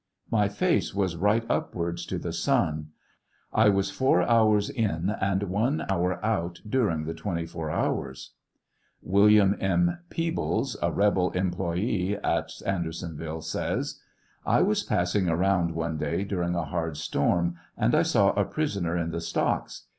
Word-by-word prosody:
My 105 Hz, -3 st, +3 dB
face 100 Hz, -1 st, 0 dB
was 95 Hz, -4 st, 0 dB
right 105 Hz, +6 st, +2 dB
upwards 85 Hz, 0 st, -2 dB
to -, -, -2 dB
the -, -, -4 dB
sun. 75 Hz, 0 st, 0 dB, 0.7 s
I 110 Hz, -1 st, +5 dB
was 100 Hz, -1 st, +1 dB
four 100 Hz, -3 st, +3 dB
hours 110 Hz, -2 st, +3 dB
in 100 Hz, -6 st, -1 dB
and 95 Hz, 0 st, +1 dB
one 110 Hz, -, 0 dB
hour 90 Hz, -1 st, +1 dB
out 90 Hz, -6 st, -1 dB
during 105 Hz, -10 st, +1 dB
the 80 Hz, +1 st, -4 dB
24 80 Hz, -2 st, -4 dB
hours. 65 Hz, -3 st, -2 dB, 0.7 s
William 100 Hz, +1 st, +5 dB
M. 175 Hz, -, +1 dB
Peebles, 165 Hz, -5 st, -1 dB
a 85 Hz, -, +1 dB
rebel 95 Hz, -1 st, +2 dB
employ^ 90 Hz, +2 st, -1 dB
at -, -, 0 dB, 0.2 s
Andersonviile, 80 Hz, -3 st, -4 dB
says: 80 Hz, -, -3 dB, 0.4 s
I -, -, +3 dB
was -, -, +2 dB
passing 90 Hz, +1 st, 0 dB
around 85 Hz, -1 st, +1 dB
one 80 Hz, -1 st, -2 dB
day 85 Hz, +5 st, -1 dB
during 90 Hz, -3 st, -2 dB
a 85 Hz, -2 st, -1 dB
hard 80 Hz, -1 st, -3 dB
storm, 85 Hz, +3 st, 0 dB, 0.2 s
and -, -, +2 dB
I -, -, +5 dB
saw -, -, +3 dB
a -, -, +1 dB
prisoner 100 Hz, -, -2 dB
in 85 Hz, -1 st, -2 dB
the 85 Hz, -, -3 dB
stocks. -, -, -2 dB
90 Hz, 145 wpm, -27 LUFS, 85-105 Hz, 0.7 s, I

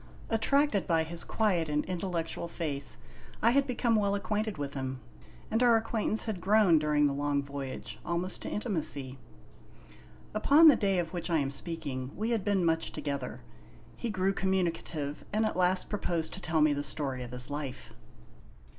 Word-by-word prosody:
Attracted 225 Hz, -1 st, +2 dB
by 165 Hz, -2 st, +3 dB
his 165 Hz, +1 st, -4 dB
quiet 185 Hz, -8 st, 0 dB
and 150 Hz, 0 st, 0 dB
intellectual 175 Hz, -2 st, -2 dB
face, 145 Hz, -5 st, -4 dB, 0.4 s
I 230 Hz, -, +4 dB
had 280 Hz, +2 st, +3 dB
become 240 Hz, -2 st, +1 dB
well 200 Hz, -2 st, +2 dB
acquainted 210 Hz, 0 st, -2 dB
with 140 Hz, -1 st, -4 dB
him, 130 Hz, -1 st, -4 dB, 0.5 s
and 225 Hz, -, +1 dB
our 240 Hz, -2 st, +6 dB
acquaintance 220 Hz, -1 st, 0 dB
had 210 Hz, -6 st, -4 dB
grown, 195 Hz, -4 st, +5 dB
during 150 Hz, -1 st, +2 dB
the 140 Hz, -, +2 dB
long 145 Hz, 0 st, 0 dB
voyage, 140 Hz, -1 st, -6 dB
almost 170 Hz, +2 st, -2 dB
to -, -, -5 dB
intimacy. 145 Hz, -, -1 dB, 1.1 s
Upon 290 Hz, +9 st, +7 dB
the 290 Hz, -, +7 dB
day 195 Hz, -4 st, +1 dB
of 175 Hz, 0 st, -2 dB
which 175 Hz, -1 st, -3 dB
I 165 Hz, -, +3 dB
am 140 Hz, -2 st, 0 dB
speaking 140 Hz, -4 st, -4 dB
we 220 Hz, +3 st, -2 dB
had 225 Hz, -4 st, 0 dB
been 195 Hz, -3 st, +1 dB
much 165 Hz, 0 st, +1 dB
together. 140 Hz, -, -4 dB, 0.5 s
He 235 Hz, -, -4 dB
grew 190 Hz, -1 st, +1 dB
communicative, 170 Hz, -6 st, -2 dB
and 215 Hz, +1 st, +1 dB
at -, -, -1 dB
last 180 Hz, 0 st, +2 dB
proposed 170 Hz, -6 st, -2 dB
to 190 Hz, -, -7 dB
tell 160 Hz, -3 st, +1 dB
me 150 Hz, -1 st, +5 dB
the 145 Hz, -, -2 dB
story 135 Hz, -3 st, -1 dB
of 120 Hz, -, -6 dB
his 125 Hz, +2 st, -4 dB
life. 140 Hz, -3 st, -5 dB
170 Hz, 170 wpm, -30 LUFS, 145-210 Hz, 1.1 s, Upon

